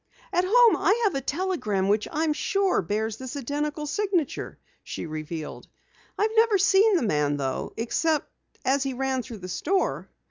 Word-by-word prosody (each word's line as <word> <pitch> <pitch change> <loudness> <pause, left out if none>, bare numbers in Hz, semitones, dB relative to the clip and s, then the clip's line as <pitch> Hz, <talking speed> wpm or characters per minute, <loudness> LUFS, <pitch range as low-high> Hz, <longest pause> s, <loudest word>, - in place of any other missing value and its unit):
"At 355 +1 +2
home 475 +2 +6
I 440 - +2
have 410 -5 +2
a 275 - -1
telegram 270 - -1
which 210 +1 +1
I'm 310 0 +1
sure 390 +4 +1
bears 215 +4 -2
this 260 +2 -7
identical 295 +3 -3
signature!" 360 -1 -1 0.3
she - - -6
revealed. 155 0 -6 0.5
"I've 430 +1 +1
never 450 -2 +5
seen 395 +2 +4
the 335 - +2
man 150 -7 +1
though 135 -2 -3
except 300 +7 0 0.4
as 270 +2 +2
he 270 -1 -2
ran 265 0 -1
through 240 -2 -9
the - - -5
store." 330 - -1
285 Hz, 165 wpm, -26 LUFS, -, 0.5 s, home